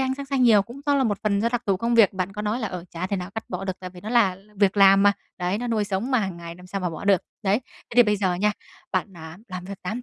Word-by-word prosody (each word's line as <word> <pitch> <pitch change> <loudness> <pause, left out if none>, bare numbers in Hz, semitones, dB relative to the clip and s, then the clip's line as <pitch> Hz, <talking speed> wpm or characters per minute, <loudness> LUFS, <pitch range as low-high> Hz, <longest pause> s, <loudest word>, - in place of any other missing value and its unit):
ánh 260 0 0
sáng 280 +1 -7
xanh 270 -2 0
nhiều 215 -5 +6
cũng 240 +6 -11
do 285 - +3
là 270 -2 +2
một 205 -3 0
phần 200 -2 +1
do 230 - +2
đặc 245 0 -2
thù 195 - +2
công 235 +5 0
việc, 225 -4 +6
bạn 185 0 -3
có 210 +1 -5
nói 215 +4 -1
là, 220 - -2
ờ, 180 -2 -6
chả 175 +2 -4
thể 200 - -2
nào 180 +1 -5
cắt 225 - -4
bỏ 180 +1 -4
được, 190 - -1
tại 185 - -7
vì 180 0 -13
nó 210 - -7
là 225 -6 +4
là 205 +3 -20
việc 200 0 +2
làm 195 0 +7
mà, 205 0 +6 0.3
đấy, 180 +3 -1
nó 245 - -3
nuôi 220 -3 0
sống 200 +6 -2
mà 255 - +3
hàng 190 -4 -2
ngày 170 0 -8
làm 180 +1 -14
sao 195 +1 -4
mà 180 - -1
bỏ 160 +4 -7
được. 195 -3 +4 0.2
Đấy, 205 +5 +2 0.3
thế - - -8
thì 245 - +9
bây 210 -2 +1
giờ 190 -3 0
nha, 210 +4 +1 0.4
bạn, 185 0 -2
à, 160 +1 -10
làm 185 -1 -6
việc 195 +1 -9
8 220 +7 -4
200 Hz, 335 wpm, -24 LUFS, 185-225 Hz, 0.4 s, thì